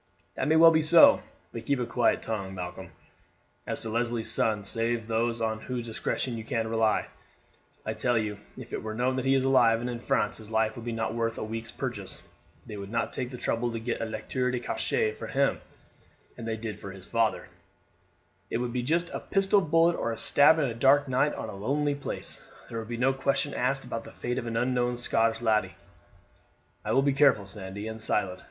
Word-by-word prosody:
"That -, -, -2 dB
may 155 Hz, -, +4 dB
well 165 Hz, +1 st, +8 dB
be 160 Hz, -1 st, +3 dB
so; 160 Hz, +2 st, +7 dB, 0.3 s
but 115 Hz, 0 st, -8 dB
keep 140 Hz, -2 st, +1 dB
a 125 Hz, -, 0 dB
quiet 120 Hz, 0 st, +1 dB
tongue, 100 Hz, -4 st, -4 dB
Malcolm, 90 Hz, 0 st, -6 dB, 0.8 s
as -, -, -2 dB
to 110 Hz, -, -4 dB
Leslie's 120 Hz, 0 st, -1 dB
son, 105 Hz, -2 st, +1 dB
save 115 Hz, +3 st, -1 dB
to 110 Hz, -, -16 dB
those 115 Hz, +1 st, 0 dB
on 110 Hz, -1 st, -1 dB
whose 125 Hz, -1 st, -4 dB
discretion 115 Hz, +1 st, -2 dB
you 110 Hz, -, -6 dB
can 115 Hz, -1 st, -2 dB
rely. 110 Hz, -1 st, +2 dB, 0.8 s
I -, -, -1 dB
tell 120 Hz, -1 st, +1 dB
you, 105 Hz, -2 st, -2 dB, 0.2 s
if -, -, -10 dB
it -, -, -2 dB
were 110 Hz, 0 st, -5 dB
known 125 Hz, +3 st, +1 dB
that 130 Hz, -, -2 dB
he 135 Hz, 0 st, +4 dB
is 135 Hz, -, +2 dB
alive 120 Hz, -4 st, +4 dB
and 120 Hz, -, -3 dB
in 120 Hz, -1 st, -4 dB
France 105 Hz, -3 st, 0 dB
his 110 Hz, -1 st, -12 dB
life 110 Hz, +1 st, +1 dB
would 120 Hz, -1 st, -8 dB
not 115 Hz, -1 st, -2 dB
be 115 Hz, -, -5 dB
worth 115 Hz, 0 st, -1 dB
a -, -, -3 dB
week's 115 Hz, +1 st, -5 dB
purchase. 115 Hz, -8 st, -5 dB, 0.4 s
They 105 Hz, -, -7 dB
would 100 Hz, 0 st, -7 dB
not 115 Hz, +2 st, -1 dB
take 125 Hz, -1 st, -3 dB
the 125 Hz, -, -7 dB
trouble 120 Hz, 0 st, -1 dB
to 115 Hz, -, -3 dB
get 115 Hz, +1 st, -3 dB
a -, -, 0 dB
lettre 110 Hz, +4 st, -2 dB
de 125 Hz, -1 st, -1 dB
cachet 110 Hz, -2 st, 0 dB
for 110 Hz, -, -8 dB
him 140 Hz, 0 st, +1 dB, 0.7 s
as 115 Hz, -, -8 dB
they 110 Hz, -1 st, -2 dB
did 110 Hz, -2 st, -6 dB
for 100 Hz, -, -8 dB
his 95 Hz, -1 st, -12 dB
father; 115 Hz, -1 st, 0 dB, 1.0 s
it -, -, -1 dB
would 120 Hz, 0 st, -3 dB
be 125 Hz, -, 0 dB
just 170 Hz, +7 st, 0 dB
a -, -, -3 dB
pistol 195 Hz, +1 st, +2 dB
bullet 165 Hz, +1 st, +3 dB
or 115 Hz, -, -2 dB
a 115 Hz, -, -4 dB
stab 145 Hz, +7 st, +5 dB
on 155 Hz, -, +2 dB
a 120 Hz, -, -2 dB
dark 140 Hz, +4 st, +4 dB
night 135 Hz, +4 st, +2 dB
or -, -, -5 dB
in 110 Hz, -, -5 dB
a -, -, -9 dB
lonely 145 Hz, +8 st, 0 dB
place. 140 Hz, 0 st, -5 dB, 0.3 s
There 115 Hz, -, -4 dB
would 110 Hz, -, -7 dB
be 120 Hz, 0 st, -4 dB
no 135 Hz, +3 st, +3 dB
question 135 Hz, +1 st, 0 dB
asked 135 Hz, +2 st, +1 dB
about 115 Hz, -2 st, -4 dB
the -, -, -10 dB
fate 125 Hz, 0 st, -3 dB
of 120 Hz, -, -6 dB
an 115 Hz, 0 st, -2 dB
unknown 125 Hz, 0 st, +1 dB
Scotch 115 Hz, -1 st, +1 dB
laddie." 110 Hz, -2 st, +1 dB, 1.1 s
"I 105 Hz, -, -2 dB
will 135 Hz, +4 st, +4 dB
be 140 Hz, -1 st, +2 dB
careful, 135 Hz, -7 st, +4 dB
Sandy, 100 Hz, +1 st, -6 dB
and 110 Hz, 0 st, -6 dB
silent. 95 Hz, -4 st, 0 dB
115 Hz, 225 wpm, -28 LUFS, 110-130 Hz, 1.1 s, well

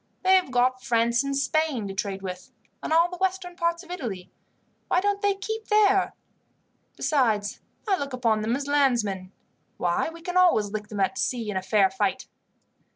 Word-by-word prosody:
They 375 Hz, +1 st, +6 dB
have 370 Hz, -6 st, +2 dB
got 255 Hz, +1 st, +1 dB
France 235 Hz, 0 st, +2 dB
and 275 Hz, 0 st, -2 dB
Spain 280 Hz, -5 st, 0 dB
to 195 Hz, -, -5 dB
trade 195 Hz, 0 st, -3 dB
with, 185 Hz, -1 st, -6 dB, 0.3 s
and -, -, -5 dB
all 335 Hz, +2 st, +5 dB
the 360 Hz, -, -7 dB
western 375 Hz, -1 st, -1 dB
parts 340 Hz, -1 st, -1 dB
of -, -, -12 dB
Italy. 220 Hz, -, -5 dB, 0.6 s
Why -, -, +2 dB
don't 405 Hz, +1 st, 0 dB
they 405 Hz, -1 st, +2 dB
keep 440 Hz, +3 st, -5 dB
there? 405 Hz, -2 st, +3 dB, 0.8 s
Besides, 240 Hz, -8 st, 0 dB, 0.3 s
I 390 Hz, -2 st, +2 dB
look 280 Hz, 0 st, -4 dB
upon 230 Hz, -4 st, +1 dB
them 225 Hz, +3 st, 0 dB
as 280 Hz, +1 st, -4 dB
landsmen. 235 Hz, -10 st, +1 dB, 0.5 s
Why, 175 Hz, -, 0 dB
we 330 Hz, 0 st, -12 dB
can 360 Hz, +1 st, -2 dB
always 280 Hz, -, +4 dB
lick 210 Hz, 0 st, -4 dB
them 205 Hz, -2 st, -4 dB
at 225 Hz, +7 st, 0 dB
sea 230 Hz, -4 st, -1 dB
in -, -, -6 dB
a 190 Hz, -, 0 dB
fair 195 Hz, 0 st, +3 dB
fight." 195 Hz, 0 st, -1 dB
260 Hz, 185 wpm, -26 LUFS, -, 0.8 s, They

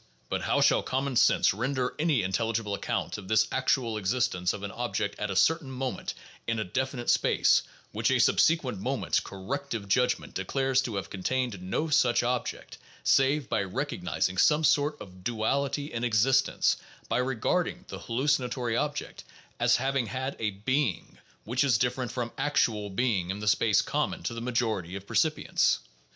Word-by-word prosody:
But -, -, -1 dB
how -, -, +1 dB
shall -, -, +4 dB
common 135 Hz, 0 st, -2 dB
sense -, -, +4 dB
render 125 Hz, +4 st, -1 dB
any 155 Hz, -, +2 dB
intelligible 110 Hz, +2 st, -1 dB
account 100 Hz, -, -2 dB
of 95 Hz, -, -11 dB
this 110 Hz, +1 st, +3 dB
actual 125 Hz, -4 st, +1 dB
existence 100 Hz, -3 st, 0 dB
of 100 Hz, -, -7 dB
an 100 Hz, -, -4 dB
object 120 Hz, -4 st, -2 dB
at 105 Hz, -, -2 dB
a 95 Hz, -, -3 dB
certain 160 Hz, -, +2 dB
moment 130 Hz, 0 st, -4 dB, 0.3 s
in 115 Hz, 0 st, 0 dB
a 110 Hz, -, 0 dB
definite 130 Hz, +5 st, -3 dB
space -, -, +4 dB, 0.3 s
which -, -, 0 dB
a -, -, +3 dB
subsequent 140 Hz, -, +3 dB
moment's 130 Hz, +6 st, 0 dB
corrective 115 Hz, +2 st, -5 dB
judgment 125 Hz, +5 st, +1 dB
declares 135 Hz, +7 st, +1 dB
to 120 Hz, -5 st, -4 dB
have 95 Hz, -, -4 dB
contained 115 Hz, +1 st, -2 dB
no 95 Hz, -, -2 dB
such 130 Hz, -7 st, +3 dB
object, 125 Hz, 0 st, -3 dB, 0.2 s
save 135 Hz, 0 st, +3 dB
by 105 Hz, -, 0 dB
recognizing 95 Hz, -, -2 dB
some 150 Hz, +8 st, +4 dB
sort 145 Hz, 0 st, +2 dB
of 90 Hz, -2 st, -12 dB
duality 140 Hz, +7 st, -1 dB
in 115 Hz, 0 st, -3 dB
existence, 120 Hz, +2 st, +2 dB, 0.3 s
by -, -, 0 dB
regarding 160 Hz, -, -1 dB
the -, -, -6 dB
hallucinatory 125 Hz, -2 st, 0 dB
object 145 Hz, +3 st, -3 dB, 0.4 s
as -, -, +4 dB
having 135 Hz, -1 st, 0 dB
had 130 Hz, +5 st, -3 dB
a 110 Hz, -, 0 dB
being 110 Hz, -, -2 dB, 0.2 s
which 125 Hz, +5 st, 0 dB
is 130 Hz, -5 st, +3 dB
different 125 Hz, +1 st, -1 dB
from 120 Hz, -2 st, -3 dB
actual 115 Hz, -7 st, +1 dB
being 100 Hz, -4 st, 0 dB
in 95 Hz, -, -2 dB
the 105 Hz, 0 st, -5 dB
space 105 Hz, -1 st, +3 dB
common -, -, -2 dB
to 90 Hz, -, -2 dB
the 115 Hz, -, -5 dB
majority 110 Hz, -7 st, -1 dB
of 100 Hz, 0 st, -7 dB
percipients? 155 Hz, +8 st, +2 dB
120 Hz, 165 wpm, -28 LUFS, 105-135 Hz, 0.4 s, shall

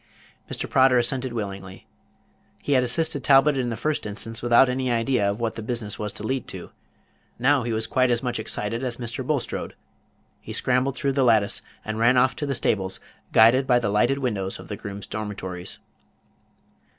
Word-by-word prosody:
Mr. -, -, -3 dB
Prodder 130 Hz, -1 st, +4 dB
assented 125 Hz, +1 st, 0 dB
willingly. 95 Hz, -4 st, -6 dB, 0.7 s
He -, -, -4 dB
had 130 Hz, -2 st, +5 dB
assisted 140 Hz, +2 st, +1 dB
Talbot 140 Hz, +1 st, +5 dB
in 125 Hz, -2 st, -1 dB
the 115 Hz, -, -4 dB
first 150 Hz, -2 st, -2 dB
instance 115 Hz, +2 st, -3 dB
without 120 Hz, +2 st, +5 dB
any 130 Hz, 0 st, -1 dB
idea 115 Hz, -3 st, +1 dB
of 100 Hz, +3 st, -3 dB
what 115 Hz, -1 st, -1 dB
the 115 Hz, -, -7 dB
business 110 Hz, -2 st, -4 dB
was 105 Hz, -1 st, -3 dB
to 105 Hz, -, -5 dB
lead 130 Hz, +2 st, -2 dB
to. -, -, -9 dB, 0.7 s
Now 135 Hz, +3 st, +3 dB
he 120 Hz, 0 st, -3 dB
was 110 Hz, 0 st, -1 dB
quite 130 Hz, +2 st, +2 dB
as 120 Hz, 0 st, 0 dB
much 120 Hz, -2 st, -2 dB
excited 110 Hz, +2 st, -3 dB
as 120 Hz, -2 st, -3 dB
Mr. 120 Hz, +1 st, -4 dB
Bulstrode. 140 Hz, -1 st, -3 dB, 0.6 s
He -, -, -9 dB
scrambled 130 Hz, +1 st, +1 dB
through 140 Hz, 0 st, -1 dB
the 135 Hz, 0 st, +2 dB
lattice, 110 Hz, -4 st, +3 dB, 0.2 s
and 110 Hz, 0 st, -4 dB
ran 120 Hz, +3 st, +4 dB
off 130 Hz, +1 st, +3 dB
to 145 Hz, -, -3 dB
the 135 Hz, -, -1 dB
stables, 95 Hz, -5 st, 0 dB, 0.3 s
guided 120 Hz, +4 st, +5 dB
by 125 Hz, -2 st, +5 dB
the 115 Hz, -4 st, 0 dB
lighted 105 Hz, +7 st, +2 dB
windows 105 Hz, -8 st, -2 dB
of -, -, -12 dB
the 105 Hz, -, -3 dB
grooms' 100 Hz, 0 st, -7 dB
dormitories. 100 Hz, -4 st, -5 dB
120 Hz, 185 wpm, -24 LUFS, 110-130 Hz, 0.7 s, had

